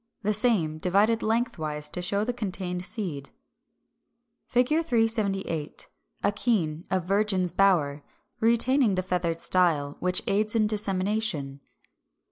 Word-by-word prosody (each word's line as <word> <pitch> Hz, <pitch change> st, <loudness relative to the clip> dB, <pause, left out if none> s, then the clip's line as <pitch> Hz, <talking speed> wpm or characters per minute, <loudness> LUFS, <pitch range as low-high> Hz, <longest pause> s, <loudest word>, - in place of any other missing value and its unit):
377. 205 Hz, -, 0 dB
The 210 Hz, -, +1 dB, 0.3 s
same, -, -, -9 dB
divided 205 Hz, +6 st, +2 dB
lengthwise, 170 Hz, -11 st, -1 dB
to 180 Hz, -, -3 dB
show 200 Hz, +3 st, 0 dB
the 245 Hz, +3 st, -2 dB
contained 185 Hz, -5 st, -3 dB
seed.] 175 Hz, -, -3 dB, 1.3 s
[Illustration: 250 Hz, +5 st, +3 dB
Fig. 330 Hz, -, -3 dB
378. 200 Hz, -, 0 dB, 0.4 s
Akene 195 Hz, -7 st, 0 dB
of 185 Hz, -2 st, -1 dB
Virgin's 195 Hz, -2 st, +1 dB
bower, 165 Hz, -6 st, +2 dB, 0.4 s
retaining 235 Hz, 0 st, +3 dB
the 185 Hz, -, -1 dB
feathered 175 Hz, -2 st, -1 dB
style, 160 Hz, -6 st, +1 dB
which 180 Hz, 0 st, 0 dB
aids 210 Hz, +2 st, +1 dB
in 220 Hz, -1 st, +3 dB
dissemination. 200 Hz, -8 st, -1 dB
195 Hz, 120 wpm, -26 LUFS, 170-220 Hz, 1.3 s, Illustration